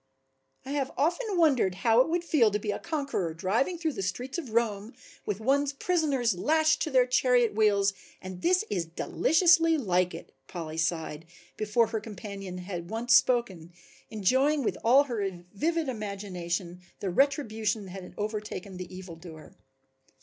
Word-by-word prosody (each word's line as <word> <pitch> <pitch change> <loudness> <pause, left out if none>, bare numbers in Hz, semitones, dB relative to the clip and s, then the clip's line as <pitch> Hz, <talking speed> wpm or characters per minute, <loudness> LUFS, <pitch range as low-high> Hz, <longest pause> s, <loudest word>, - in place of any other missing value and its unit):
"I 270 - -6
have 280 -2 -1
often 355 - 0
wondered 265 - +3
how 225 +5 +4
it 260 - 0
would 340 +1 0
feel 290 -10 +3
to 210 - -1
be 210 0 -3
a - - -4
conqueror 275 - -3
driving 220 - 0
through 325 -2 -2
the - - -4
streets 245 - -3
of 290 -8 -7
Rome 220 -1 -1 0.3
with 205 -1 -2
one's 280 +4 +1
prisoners 280 -7 +1
lashed 315 - +2
to - - 0
their 255 -3 +4
chariot 250 -2 +3
wheels 200 -2 +3 0.3
and 185 -1 -8
this 365 +4 +2
is 175 -3 -1
deliciously 330 - +3
like 180 - +1
it," 165 - -10 0.2
Polly 160 -2 -6
sighed 160 -1 -2 0.3
before 215 +2 +2
her 220 0 -3
companion 200 -3 -7
had 180 -2 -6
once 235 +2 +2
spoken, 195 -11 +1 0.4
enjoying 260 +8 +2
with - - -1
all 260 +5 +6
her 200 -9 -4
vivid 325 +8 0
imagination 190 -6 -4 0.2
the 195 - -2
retribution 220 -5 0
that 185 - -10
had 185 -1 -9
overtaken 210 -3 -5
the 185 -1 -8
evildoer. 170 -4 -11
220 Hz, 155 wpm, -28 LUFS, 185-275 Hz, 0.4 s, all